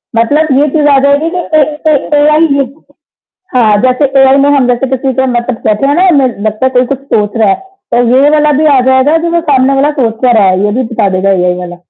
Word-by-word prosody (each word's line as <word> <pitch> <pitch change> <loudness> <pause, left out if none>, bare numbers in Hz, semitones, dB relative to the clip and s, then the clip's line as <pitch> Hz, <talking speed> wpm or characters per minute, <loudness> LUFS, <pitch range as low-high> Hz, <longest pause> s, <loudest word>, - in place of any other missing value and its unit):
मतलब 290 +8 +1
ये 295 - +2
चीज़ 295 +1 0
आ 280 - +3
जाएगी 285 +3 +1
कि 360 +1 -4
कहीं 300 -1 +1
कहीं 295 0 0
एआई 305 +2 +3
ही 280 0 0 1.0
हाँ, 220 -4 +2
जैसे 255 +3 +1
एआई 270 0 +4
में 285 - +2
हम 255 -3 +1
जैसे 245 +2 -1
किसी 265 +1 -3
के 265 +2 -1
मतलब 240 -1 -4
बैठे 215 +5 0
हैं 355 +6 +2
ना 275 -3 +2
लगता 215 -1 -3
है - - +2
कोई 250 0 +2
कुछ 270 +1 -4
सोच 210 +1 -1
रहा 220 -3 +2
है, 195 - +2
तो 385 -9 -5
ये 275 +3 +3
वाला 300 0 +1
भी 310 - +1
आ - - +3
जाएगा 260 +4 +2
जो 340 - -2
वो 340 0 0
सामने 265 0 +2
वाला 295 +2 +1
सोच 225 -2 0
तो 245 - +3
रहा 200 -3 +3
है 185 0 0
ये 205 - -1
भी 255 +5 -2
बता 225 -4 -2
देगा 190 +1 0
एआई 180 0 0
वाला। 175 -1 -8
265 Hz, 245 wpm, -9 LUFS, 230-295 Hz, 1.0 s, एआई